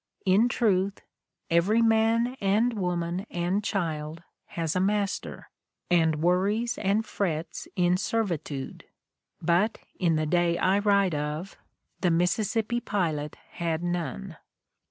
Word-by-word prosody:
In 200 Hz, +6 st, +4 dB
truth, 200 Hz, -5 st, +1 dB, 0.5 s
every 200 Hz, +8 st, +3 dB
man 225 Hz, +2 st, +3 dB
and 215 Hz, +5 st, +2 dB
woman 180 Hz, -1 st, -2 dB
and 175 Hz, +4 st, -1 dB
child 160 Hz, -5 st, -3 dB, 0.2 s
has 165 Hz, -1 st, -3 dB
a -, -, +2 dB
master, 200 Hz, +1 st, -2 dB, 0.4 s
and 160 Hz, -3 st, +3 dB
worries 205 Hz, +7 st, +1 dB
and 205 Hz, +3 st, +1 dB
frets 170 Hz, -6 st, -3 dB
in 180 Hz, 0 st, +3 dB
servitude; 175 Hz, -10 st, -3 dB, 0.6 s
but, 175 Hz, +7 st, +2 dB, 0.2 s
in 170 Hz, -3 st, +2 dB
the 155 Hz, 0 st, 0 dB
day 170 Hz, +2 st, +2 dB
I 190 Hz, +3 st, +2 dB
write 200 Hz, -3 st, +3 dB
of, 150 Hz, +5 st, -3 dB, 0.4 s
the 180 Hz, -, +2 dB
Mississippi 215 Hz, +7 st, +1 dB
pilot 160 Hz, -9 st, -2 dB
had 165 Hz, -1 st, -2 dB
none." 175 Hz, 0 st, -3 dB
185 Hz, 115 wpm, -27 LUFS, 170-210 Hz, 0.6 s, In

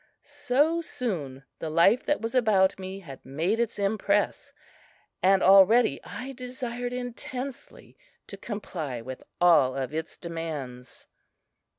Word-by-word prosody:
So 300 Hz, +7 st, +1 dB
soon 160 Hz, -, -4 dB, 0.2 s
the 160 Hz, -, -4 dB
life 180 Hz, +10 st, +4 dB
that 295 Hz, -, 0 dB
was 225 Hz, +2 st, -3 dB
about 200 Hz, -7 st, +3 dB
me 190 Hz, +1 st, -6 dB
had 140 Hz, -7 st, -11 dB
made 165 Hz, -, -1 dB
its 235 Hz, -1 st, -1 dB
impress, 205 Hz, 0 st, 0 dB, 0.7 s
and 190 Hz, +1 st, +4 dB
already 195 Hz, +5 st, +6 dB
I 260 Hz, +2 st, -7 dB
desired 245 Hz, -1 st, -5 dB
intensely 250 Hz, +1 st, -7 dB, 0.3 s
to -, -, -9 dB
comply 165 Hz, -, -5 dB
with 130 Hz, +2 st, -8 dB, 0.2 s
all 155 Hz, -7 st, +5 dB
of 135 Hz, +1 st, -3 dB
its 160 Hz, +1 st, -4 dB
demands. 150 Hz, -7 st, -7 dB
195 Hz, 120 wpm, -27 LUFS, 160-245 Hz, 0.7 s, already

